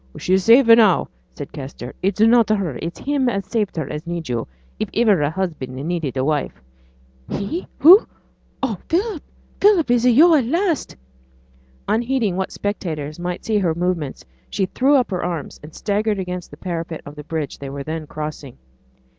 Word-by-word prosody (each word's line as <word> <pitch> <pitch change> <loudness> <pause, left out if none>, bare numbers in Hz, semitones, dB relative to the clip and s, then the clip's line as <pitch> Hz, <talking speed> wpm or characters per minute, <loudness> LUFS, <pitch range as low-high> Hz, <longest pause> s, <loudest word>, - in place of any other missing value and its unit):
'She's 185 +1 +1
safe 240 +4 +7
now,' 230 -5 +6 0.2
said - - -9
Kester. 130 -2 -8
'It's 195 +2 -1
not 225 +1 +5
her 195 -10 0
it's 170 +1 -5
him 275 -3 0
as 200 -4 -2
saved 210 0 -2
her 155 -4 -2
as 150 +3 -6
needs 170 -4 -4
yo', 120 -2 -2 0.3
if 215 - -2
iver 200 -11 +3
husband 160 -7 -4
needed 150 -1 -3
a 130 - 0
wife.' 145 - -1 0.7
'He? 305 - -4
who? 365 +8 +8 0.6
O 225 -9 -1
Philip! 370 0 0 0.4
Philip! 390 -10 +4
is 240 -1 +3
it 245 -2 +4
yo' 330 +5 +7
at 280 -6 +3
last?' 335 - -1 0.9
Unheeding 230 -3 0
what 190 0 -2
spectators 160 -7 -4
might 175 0 -4
see 215 -2 +1
her 170 -5 0
movements, 170 -5 -2 0.2
she 195 - 0
threw 265 +9 +2
up 255 -6 +2
her 185 - -2
arms 170 -4 -4
and 150 +1 -12
staggered 210 0 0
against 180 -1 -5
the - - -13
parapet 170 -3 -5
of 145 - -9
the 150 0 -9
bridge 155 -1 -4
they 140 - -6
were 140 0 -6
then 155 +1 -5
crossing. 150 -4 -7
185 Hz, 175 wpm, -21 LUFS, 155-235 Hz, 0.9 s, who